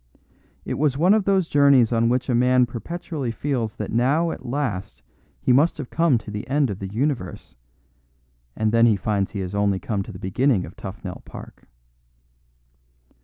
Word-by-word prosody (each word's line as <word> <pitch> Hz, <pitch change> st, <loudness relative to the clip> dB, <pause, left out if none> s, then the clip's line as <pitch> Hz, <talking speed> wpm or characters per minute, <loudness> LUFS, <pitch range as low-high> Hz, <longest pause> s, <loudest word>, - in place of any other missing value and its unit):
It -, -, -3 dB
was 145 Hz, -3 st, +1 dB
one 180 Hz, +6 st, +4 dB
of 215 Hz, -3 st, +2 dB
those 190 Hz, -3 st, +2 dB
journeys 140 Hz, -6 st, +4 dB
on 115 Hz, 0 st, +2 dB
which 125 Hz, +1 st, 0 dB
a 130 Hz, -, 0 dB
man 125 Hz, +1 st, +4 dB
perpetually 140 Hz, +3 st, -5 dB
feels 115 Hz, -2 st, -2 dB
that 105 Hz, -, -5 dB
now 145 Hz, +9 st, +2 dB
at -, -, -8 dB
last 120 Hz, -7 st, -4 dB, 0.4 s
he 125 Hz, -, +2 dB
must 145 Hz, +7 st, +3 dB
have 145 Hz, -5 st, -7 dB
come 165 Hz, -6 st, +3 dB
to 110 Hz, -, -8 dB
the 105 Hz, 0 st, -6 dB
end 140 Hz, -3 st, +1 dB
of 95 Hz, -, -6 dB
the 95 Hz, -, -5 dB
universe, 120 Hz, -, -3 dB, 1.0 s
and 110 Hz, -1 st, 0 dB
then 115 Hz, -2 st, +4 dB
finds 100 Hz, 0 st, -1 dB
he 100 Hz, -, -5 dB
has 90 Hz, 0 st, -5 dB
only 100 Hz, -1 st, +1 dB
come 100 Hz, +2 st, -3 dB
to 105 Hz, -, -7 dB
the 90 Hz, -, -9 dB
beginning 100 Hz, +2 st, +1 dB
of -, -, -12 dB
Tufnell -, -, -8 dB
Park. -, -, -12 dB
120 Hz, 175 wpm, -23 LUFS, 105-145 Hz, 1.0 s, one